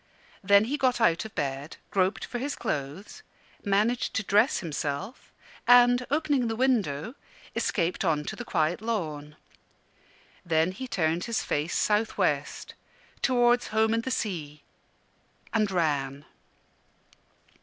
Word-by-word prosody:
Then 200 +1 +6
he 270 +7 -2
got 255 -2 +2
out 170 -5 +2
of 220 - -10
bed, 140 +1 -3
groped 190 0 +1
for 245 - -5
his 280 +3 -3
clothes, 150 - -5 0.4
managed 210 +4 +1
to 220 - 0
dress 205 +2 +3
himself, 155 - -4 0.4
and, 245 0 +6
opening 285 -4 +1
the 225 - -2
window, 220 - 0 0.4
escaped 175 -1 0
on 155 -4 +1
to - - -5
the 245 - -6
quiet 170 -4 0
lawn. 155 -10 -3 1.1
Then 165 +1 +1
he 260 +8 -7
turned 165 -5 0
his 230 -2 -1
face 150 +4 -1
south 215 +1 +1
west, - - -1 0.5
towards 245 -1 +3
home 220 +1 +2
and 230 - +1
the 260 - -4
sea 165 - -4 0.9
and 215 -3 +2
ran. 145 -6 -1
200 Hz, 130 wpm, -27 LUFS, 155-240 Hz, 1.1 s, Then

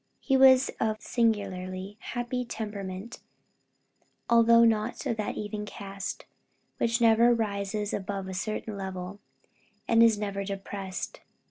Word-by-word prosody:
He 270 - +1
was 265 0 +6
of 220 -1 0
a - - -31
singularly 195 -4 -1
happy 245 +1 -3
temperament, 210 -2 -6 1.1
although 230 0 +6
not 220 0 0
of 230 - 0
that 210 - -2
even 210 0 -4
cast, 195 -1 -6 0.5
which 235 +1 +1
never 235 +1 +5
rises 205 -1 -2
above 195 -1 -3
a 190 - -5
certain 215 +2 -3
level, 190 0 -6 0.7
and 230 0 +5
is 225 -2 +6
never 200 -1 -3
depressed. 195 -1 -5
210 Hz, 125 wpm, -28 LUFS, 195-230 Hz, 1.1 s, was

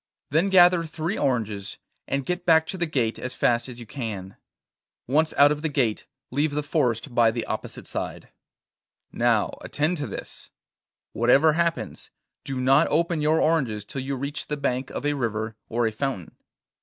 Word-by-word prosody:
Then 165 +7 +3
gather 180 -2 +6
three 165 +4 -3
oranges, 110 -7 -1 0.3
and 140 -1 -1
get 180 0 -2
back 160 -2 +5
to 190 - -5
the 170 - 0
gate 120 -7 -1
as 125 - -5
fast 120 +1 +1
as 120 -1 -9
you 120 - -8
can. 105 -6 -6 0.7
Once 155 +5 +2
out 145 +1 +7
of 150 0 -2
the 160 - -1
gate, 125 -7 0 0.2
leave 145 +3 0
the 150 - 0
forest 135 -4 0
by 120 -1 +5
the 115 0 -3
opposite - - -5
side. - - -5 0.8
'Now, - - +1
attend 155 +4 -1
to 145 - -3
this: - - -8 0.6
whatever 135 +7 +4
happens, 165 - -2 0.3
do 135 -1 -4
not 135 +4 +4
open 165 0 +1
your 155 +2 +3
oranges 130 -10 +1
till 135 - -5
you 135 +1 -3
reach 140 +3 -4
the 150 - -2
bank 130 -2 -1
of - - -5
a 145 - +2
river, 110 -4 -2
or 120 +1 +1
a 110 - +1
fountain. 110 - -4
140 Hz, 175 wpm, -25 LUFS, 120-155 Hz, 0.8 s, out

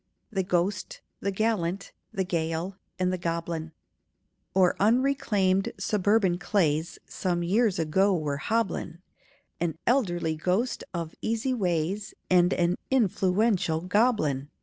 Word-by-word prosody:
THE 195 -3 0
GHOST, 185 +2 -1 0.2
THE 200 - -1
GALLANT, 195 -2 -1 0.2
THE 195 -4 -1
GAEL, 170 +1 -2 0.2
AND 185 0 +1
THE 185 - -2
GOBLIN 165 -1 -3 0.8
O'ER 185 -2 +4
unreclaimed 210 -5 +2
suburban 195 -2 +2
clays 170 -5 0
Some 175 -2 -2
years 205 +3 +2
ago 185 +5 +2
were 145 -3 -2
hobblin' 190 -3 -2 0.6
An 165 -2 -1
elderly 175 -11 +1
ghost 185 +10 0
of 165 -3 -4
easy 230 +4 0
ways, 190 -1 -1 0.2
And 180 0 +5
an 175 +1 +1
influential 195 -7 +2
goblin. 180 - +1
185 Hz, 115 wpm, -27 LUFS, 170-210 Hz, 0.8 s, And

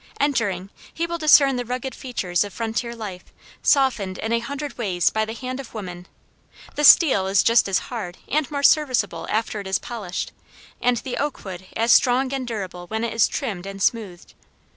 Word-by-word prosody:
Entering 205 -9 0 0.2
he 335 - -2
will 340 0 -4
discern 280 -4 +6
the 245 - -2
rugged 250 +2 -4
features 185 -9 -1
of 205 - -7
frontier 230 +2 -3
life 200 -5 -7 0.4
softened 230 -9 +2
in 225 +1 -2
a 235 - +2
hundred 280 +4 -6
ways 190 -7 +1
by 220 0 0
the 220 +1 -6
hand 255 +1 -5
of 260 -4 -9
woman. 180 -4 -7 0.7
The 295 - -2
steel 270 - +7
is 195 0 +3
just 230 -3 +4
as 190 - +3
hard 200 -7 -5
and 300 -2 0
more 285 -1 -3
serviceable 260 -10 +2
after 220 -1 -1
it 200 - -7
is 190 +1 +1
polished, 205 -7 -5 0.5
and 245 0 +2
the 245 +2 -5
oak 290 -5 -3
wood 185 -1 -8
as 230 +1 +2
strong 260 +2 +3
and 260 -2 -3
durable 185 -6 -5
when 220 +3 -3
it 230 -1 -2
is 225 -1 +4
trimmed 195 -8 -4
and 195 0 -7
smoothed. 195 -4 -2
230 Hz, 190 wpm, -23 LUFS, 195-260 Hz, 0.7 s, steel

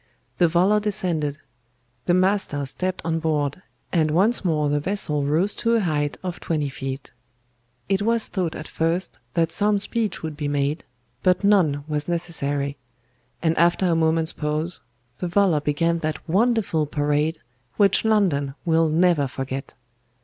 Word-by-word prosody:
The 175 - +6
volor 185 +6 +3
descended; 175 -9 -1 0.7
the 175 - +4
master 185 -6 +1
stepped 185 +7 -3
on 165 0 0
board, 150 0 -1 0.3
and 160 -3 +3
once 200 +10 +3
more 155 -5 +1
the 145 0 +1
vessel 150 -4 0
rose 165 +8 +1
to 230 0 +2
a - - +3
height 150 -6 -1
of 180 -1 -4
twenty 150 -4 -1
feet. 135 0 -6 0.8
It 195 +1 +1
was 230 +1 +1
thought 175 -4 -2
at 155 - -7
first 170 +3 -2 0.2
that 165 -1 +2
some 205 +2 +2
speech 215 0 -2
would 160 -2 -4
be 145 -1 -3
made, 145 +2 -1 0.4
but 185 +2 +2
none 175 -9 +3
was 150 -1 -2
necessary; 145 -5 -2 0.7
and 165 -1 +2
after 175 +2 +3
a 170 -2 +2
moment's 160 0 +1
pause, 155 +3 -3 0.4
the 180 - -2
volor 175 -4 +3
began 165 +3 +1
that 155 -1 -4
wonderful 195 -5 +1
parade 150 +2 0 0.4
which 200 -2 +4
London 175 -11 +1
will 165 -1 +3
never 165 -3 +3
forget. 135 +1 -5
165 Hz, 150 wpm, -23 LUFS, 150-185 Hz, 0.8 s, The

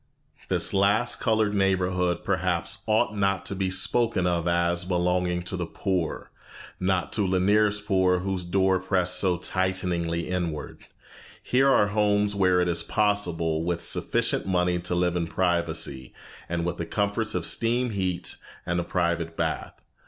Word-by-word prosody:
This - - 0
last 100 +5 +2
colored 110 -2 +1
neighborhood 90 -2 +1
perhaps 90 -2 -1
ought 110 0 +2
not 100 -2 0
to 100 - -2
be 95 -1 -1
spoken 95 +1 +2
of 85 -1 0
as 85 0 +1
belonging 90 0 0
to 95 +2 -1
the 90 -2 -3
poor; 90 -3 -3 0.5
not 90 -1 0
to 105 -3 +1
Lanier's 100 +3 +2
poor 95 -3 +2
whose 95 -1 -2
door 95 +1 +2
pressed 90 -1 0
so 90 -3 +1
tighteningly 90 -2 -1
inward. 85 -5 -4 0.6
Here 135 +2 +3
are 105 -6 +4
homes 105 -1 +2
where 95 -2 +3
it 90 - +1
is 85 -1 0
possible, 85 -6 0
with 85 0 -2
sufficient - - 0
money, 90 -1 +1
to 90 0 -1
live 90 0 +1
in 85 -1 -1
privacy, 80 -7 -1 0.3
and 85 0 -2
with 90 0 -2
the 85 - -4
comforts 105 +2 -1
of 90 -2 -1
steam 120 +1 +1
heat 95 -3 -2 0.3
and 85 0 -1
a - - -1
private 85 -2 -1
bath. - - -3
90 Hz, 150 wpm, -26 LUFS, 85-100 Hz, 0.6 s, are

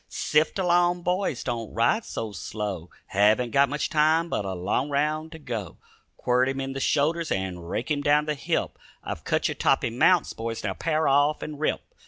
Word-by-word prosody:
"Sift 155 +4 +1
along, 175 -1 +2
boys, 180 -7 -1
don't 115 -3 -4
ride 120 - +2
so 110 -2 -5
slow; 100 -2 -5 0.2
Haven't 110 +5 +2
got 140 -1 +4
much 145 +1 -1
time 160 +2 +2
but 105 - -2
a 95 - -3
long 100 +10 -1
round 155 +2 -1
to 160 - -9
go. 115 - -6 0.4
Quirt 125 +1 +2
him 135 0 -3
in 135 0 -3
the 135 - -4
shoulders 155 +4 +1
and 90 -3 -3
rake 125 - -3
him 145 -1 +1
down 145 +1 +3
the 150 - -1
hip; 140 - -2 0.2
I've - - -5
cut - - +1
you - - -2
toppy - - +1
mounts, 165 +8 +3
boys, 115 0 -5
now 100 -3 -1
pair 155 - 0
off 145 +2 +3
and 150 -1 -7
rip. 155 - 0
140 Hz, 195 wpm, -26 LUFS, 115-155 Hz, 0.4 s, got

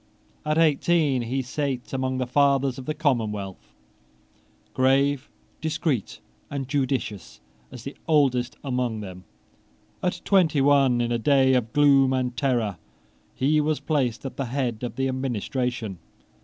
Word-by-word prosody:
At 155 +1 +1
eighteen 155 -3 +3
he 130 +3 -2
sate 130 -1 -3
among 130 0 -1
the 130 - -1
fathers 135 0 +2
of 130 - -10
the 155 - -2
commonwealth, 110 - -2 1.0
grave, 135 +1 +2 0.3
discreet, 155 - -2 0.3
and 135 -2 -4
judicious 130 - -2 0.3
as 125 -3 -10
the 140 - -7
oldest 130 -6 +2
among 125 -5 -2
them. 90 -2 -9 0.8
At 180 -1 -1
twenty 175 -7 +3
one, 135 -3 +4
in 120 0 -1
a 120 - 0
day 130 +2 +4
of 120 -3 +1
gloom 140 -2 +4
and 125 -1 -1
terror, 120 -9 0 0.6
he 150 +3 +2
was 155 0 0
placed 135 -6 -1
at 130 -1 -6
the 135 - -1
head 120 -3 -2
of 125 - -4
the 135 0 0
administration. 125 -5 -3
130 Hz, 140 wpm, -25 LUFS, 120-145 Hz, 1.0 s, one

